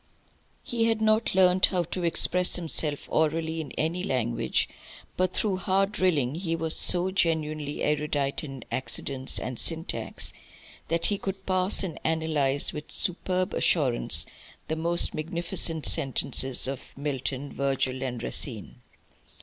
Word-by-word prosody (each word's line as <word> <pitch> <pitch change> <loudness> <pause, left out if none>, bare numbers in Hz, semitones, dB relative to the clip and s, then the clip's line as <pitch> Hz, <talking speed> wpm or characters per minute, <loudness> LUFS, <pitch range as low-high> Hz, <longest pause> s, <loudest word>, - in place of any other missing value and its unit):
He 230 -2 -1
had 225 -1 +1
not 220 -1 +1
learnt 185 0 +5
how 180 -2 -1
to 175 +2 -5
express 180 +2 +2
himself 155 -4 0
orally 160 +1 0
in 150 - -9
any 170 +3 -2
language, 120 -6 0 0.5
but 185 0 +1
through 195 -2 -1
hard 195 +1 +1
drilling 160 -11 0
he 165 0 -3
was 165 -1 -1
so 180 +1 +6
genuinely 155 -5 -1
erudite 150 -2 -1
in 135 -5 -8
accidence 130 +1 0
and 125 -2 -4
syntax 165 0 +1 0.5
that 165 +1 0
he 205 -1 0
could 195 0 -6
parse 185 +1 +1
and 180 -4 -5
analyse 155 -4 +1
with 150 0 -8
superb 185 0 0
assurance 135 -8 +1 0.4
the 160 - -1
most 170 +2 +2
magnificent 170 0 -1
sentences 135 -3 +3
of 135 0 -7
Milton, 140 -1 -3
Virgil, 135 -1 -1
and 125 -3 -4
Racine. 120 -1 -2
160 Hz, 135 wpm, -26 LUFS, 140-180 Hz, 0.5 s, so